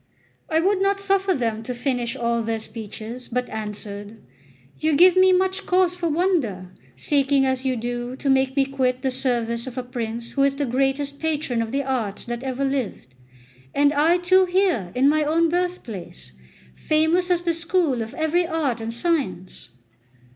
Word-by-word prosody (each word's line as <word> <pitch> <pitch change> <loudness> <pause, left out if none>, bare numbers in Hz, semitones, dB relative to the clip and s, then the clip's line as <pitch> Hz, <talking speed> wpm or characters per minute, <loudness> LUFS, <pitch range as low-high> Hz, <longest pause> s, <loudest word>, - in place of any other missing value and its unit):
I 320 - +2
would 385 +3 +2
not 395 0 +2
suffer 390 -1 +2
them 225 -4 -1
to 245 +2 -5
finish 245 -2 -2
all 235 0 0
their 225 0 -1
speeches, 225 +2 -7
but 250 +1 -2
answered: 210 0 -6 0.6
"You 310 -1 +1
give 360 +4 +7
me 375 0 +6
much 375 +1 +1
cause 365 -1 +3
for 350 -2 -2
wonder, 295 - 0 0.2
seeking 275 -1 +2
as 260 0 -1
you 260 -1 +1
do 240 +1 -4
to 275 - -5
make 265 0 +2
me 275 -1 +3
quit 260 -2 -1
the 265 - +1
service 240 -2 -1
of 255 0 -8
a 255 - -2
prince 235 -2 -5
who 275 - -1
is 275 0 +3
the 285 +1 -1
greatest 275 +3 -1
patron 300 -7 -1
of 225 -1 -3
the 280 +1 0
arts 240 -7 -2
that 240 0 -4
ever 265 +1 -2
lived; 250 - -3 0.6
and 285 +1 +4
I 315 +4 +4
too 370 +1 +4
here 355 - +1
in 260 +2 +4
my 305 +2 +3
own 325 +2 +2
birthplace, 275 - -4 0.4
famous 320 - +1
as 350 -1 +1
the 340 -1 +1
school 335 -6 +1
of 220 0 -6
every 330 +2 +1
art 290 -9 -1
and 225 0 -4
science! 235 - -2
270 Hz, 175 wpm, -23 LUFS, 235-335 Hz, 0.6 s, give